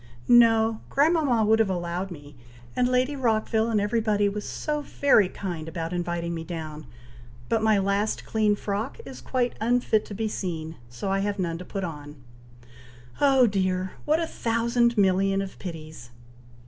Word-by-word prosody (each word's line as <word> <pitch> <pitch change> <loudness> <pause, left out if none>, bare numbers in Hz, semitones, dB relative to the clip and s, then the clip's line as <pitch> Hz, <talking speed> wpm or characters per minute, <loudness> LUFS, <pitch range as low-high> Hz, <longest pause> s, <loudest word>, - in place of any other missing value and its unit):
"No! 225 -2 +5
grandmama 285 -6 +3
would 220 +1 +4
have 220 -3 +3
allowed 175 +1 -3
me, 145 -4 -11 0.4
and 250 - +2
Lady 255 +3 +1
Rockville 225 -3 +1
and 220 -2 +2
every 215 +3 0
body 205 -2 +2
was 205 +1 -4
so 300 -1 -2
very 270 -9 +3
kind 175 -6 -5
about 165 0 -4
inviting 175 -1 -2
me 165 -1 -4
down; 155 -3 -7 0.6
but 225 - +1
my 220 -1 +4
last 200 +2 0
clean 215 -2 +2
frock 205 +5 -3
is - - -9
quite 250 -2 -1
unfit 235 -2 +2
to 205 - -8
be 220 +2 -1
seen, 165 -6 -4
so 120 +11 -4
I 195 - +1
have 205 +1 -1
none 170 -3 -2
to 180 - -8
put 195 +1 -5
on. 150 -4 -7 1.1
Oh, 270 -3 +5
dear! 185 -3 0
what 310 +2 +2
a 335 - 0
thousand 235 -2 0
million 195 0 +3
of 195 -1 -5
pities!" 155 -8 -8
205 Hz, 165 wpm, -26 LUFS, 175-230 Hz, 1.1 s, No